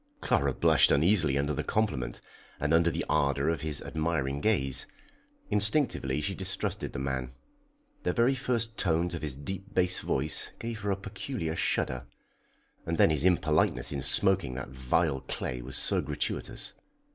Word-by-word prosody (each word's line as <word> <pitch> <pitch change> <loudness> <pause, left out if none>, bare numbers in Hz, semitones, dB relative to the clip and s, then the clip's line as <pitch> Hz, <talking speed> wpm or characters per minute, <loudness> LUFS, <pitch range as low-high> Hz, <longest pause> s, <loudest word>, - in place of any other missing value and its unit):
Clara 70 - +1
blushed - - +4
uneasily 80 -2 +3
under 70 +2 0
the - - -2
compliment, 65 - -1 0.4
and 75 +2 0
under 85 +1 +4
the - - -3
ardour 70 +1 +1
of 80 -4 -1
his 75 -2 -3
admiring 70 -3 -2
gaze. 70 -11 +1 0.6
Instinctively 105 - +2
she 95 +6 -1
distrusted 95 0 -3
the - - -6
man. 65 -1 -3 0.7
The - - 0
very 120 +2 +3
first 120 -4 -2
tones 85 0 +1
of 85 - -4
his 75 -4 -3
deep 95 +8 -7
bass 90 0 +4
voice 70 +4 0
gave 115 -1 -5
her 100 0 -3
a 100 - +2
peculiar 100 -3 -4
shudder. 65 -6 -1 0.8
And 85 0 -2
then - - +5
his 75 +1 +2
impoliteness 75 -7 +2
in 70 -2 -3
smoking 65 -1 +3
that 65 0 -6
vile 65 +3 0
clay 60 -1 -4
was 65 +2 -6
so - - +3
gratuitous. - - -2
80 Hz, 160 wpm, -29 LUFS, 70-95 Hz, 0.8 s, then